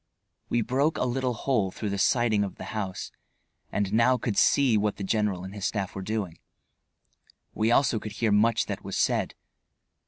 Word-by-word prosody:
We 120 Hz, -1 st, +1 dB
broke 135 Hz, +7 st, +1 dB
a -, -, 0 dB
little 125 Hz, 0 st, -1 dB
hole 110 Hz, -5 st, 0 dB
through 105 Hz, +2 st, -4 dB
the 100 Hz, -, -2 dB
siding 110 Hz, -1 st, +2 dB
of 100 Hz, -, -5 dB
the -, -, -9 dB
house, 100 Hz, -4 st, -4 dB, 0.6 s
and 100 Hz, -1 st, -1 dB
now 115 Hz, +3 st, +4 dB
could 115 Hz, -3 st, -2 dB
see 135 Hz, 0 st, +4 dB
what 105 Hz, 0 st, +1 dB
the 100 Hz, -, -6 dB
general 100 Hz, -2 st, 0 dB
and 95 Hz, +1 st, -8 dB
his 105 Hz, -1 st, -2 dB
staff 100 Hz, -3 st, -3 dB
were 95 Hz, -, -5 dB
doing. 100 Hz, -4 st, -3 dB, 1.1 s
We 110 Hz, +1 st, +1 dB
also 120 Hz, -2 st, +3 dB
could 105 Hz, 0 st, -7 dB
hear 110 Hz, 0 st, 0 dB
much 115 Hz, +2 st, +3 dB
that -, -, -5 dB
was -, -, -4 dB
said. -, -, +1 dB
110 Hz, 185 wpm, -27 LUFS, 100-120 Hz, 1.1 s, now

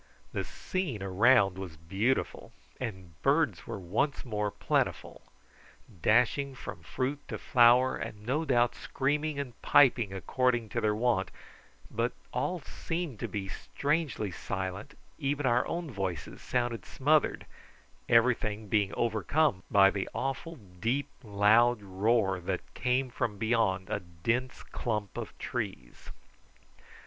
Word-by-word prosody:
The -, -, -1 dB
scene 155 Hz, -, -3 dB
around 100 Hz, 0 st, +4 dB
was 90 Hz, -5 st, -7 dB
beautiful, 95 Hz, +11 st, -1 dB, 0.3 s
and 95 Hz, -9 st, -6 dB
birds 150 Hz, +3 st, +2 dB
were 115 Hz, -, -4 dB
once 110 Hz, -, -1 dB
more 105 Hz, -3 st, -1 dB
plentiful, -, -, -1 dB, 0.8 s
dashing 125 Hz, -, +3 dB
from -, -, -8 dB
fruit 135 Hz, +3 st, -2 dB
to -, -, -4 dB
flower, 125 Hz, +1 st, +5 dB
and 105 Hz, 0 st, -7 dB
no 140 Hz, +7 st, 0 dB
doubt 120 Hz, -5 st, +3 dB
screaming 150 Hz, +2 st, -1 dB
and 130 Hz, -5 st, -6 dB
piping 125 Hz, -7 st, +5 dB
according 120 Hz, +3 st, 0 dB
to 115 Hz, -, -2 dB
their 105 Hz, -1 st, +2 dB
wont, 110 Hz, -5 st, +1 dB, 0.6 s
but 115 Hz, +2 st, 0 dB, 0.2 s
all 180 Hz, -2 st, -1 dB
seemed 165 Hz, -, -4 dB
to -, -, -2 dB
be 100 Hz, -2 st, -4 dB
strangely 140 Hz, -, -2 dB
silent, 95 Hz, +2 st, -5 dB, 0.2 s
even 145 Hz, -1 st, -1 dB
our 120 Hz, 0 st, +3 dB
own 170 Hz, -3 st, -3 dB
voices 95 Hz, -, -4 dB
sounded 120 Hz, -2 st, -1 dB
smothered, 150 Hz, +3 st, +1 dB, 0.6 s
everything 110 Hz, -3 st, +2 dB
being 100 Hz, -2 st, +2 dB
overcome 115 Hz, -, +1 dB
by 100 Hz, -1 st, +6 dB
the 100 Hz, -1 st, -3 dB
awful 135 Hz, +5 st, -3 dB, 0.2 s
deep 130 Hz, +8 st, 0 dB
loud 110 Hz, +2 st, +4 dB
roar 100 Hz, 0 st, +1 dB
that 90 Hz, -, -4 dB
came 125 Hz, +1 st, 0 dB
from 120 Hz, -4 st, -2 dB
beyond 110 Hz, -4 st, +1 dB
a -, -, -1 dB
dense 115 Hz, +10 st, -2 dB
clump 105 Hz, -4 st, -3 dB
of -, -, -6 dB
trees. -, -, -5 dB
115 Hz, 125 wpm, -30 LUFS, 100-130 Hz, 0.8 s, by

